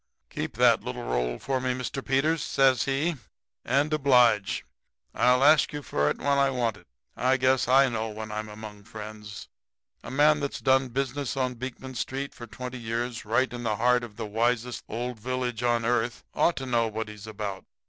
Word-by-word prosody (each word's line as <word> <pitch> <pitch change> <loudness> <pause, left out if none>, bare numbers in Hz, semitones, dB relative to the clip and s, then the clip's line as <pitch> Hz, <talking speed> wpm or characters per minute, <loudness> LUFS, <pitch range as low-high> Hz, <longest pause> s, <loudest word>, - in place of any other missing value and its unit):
"'Keep - - -4
that - - +5
little - - -5
roll - - -1
for 130 -1 -2
me, 125 0 0
Mr. 130 +1 -4
Peters,' 150 +4 +1
says 135 -2 +3
he, 145 +4 0 0.5
'and 140 +5 +1
oblige. 125 -8 +3 0.5
I'll 125 +2 +4
ask 150 +1 +5
you 145 -1 -5
fer 75 - +1
it - - -2
when 140 0 +1
I 140 0 +4
want 120 -4 0
it. 105 - -18 0.3
I 130 +1 +2
guess 130 -1 +2
I 135 +2 +6
know 115 -2 -2
when 110 0 -7
I'm 110 0 -4
among 105 -1 -10
friends. 105 -1 -9 0.5
A - - -9
man 150 +2 +4
that's 140 -1 -3
done 130 0 +3
business 135 0 -2
on 130 -1 0
Beekman 130 +1 -7
street 135 +3 -4
for 120 - -10
twenty 125 +3 -7
years, 115 +1 -3
right 120 +4 +1
in 120 - -5
the 110 -3 0
heart 125 +2 +3
of 110 -3 -9
the 115 0 -4
wisest 120 +3 -1
old 120 +1 -4
village 125 0 -2
on 120 -1 +1
earth, 120 0 0
ought 170 - +2
to 135 - -4
know 120 -3 +1
what 110 0 -4
he's 105 0 -10
about. 100 -3 -5
125 Hz, 190 wpm, -27 LUFS, 110-135 Hz, 0.5 s, I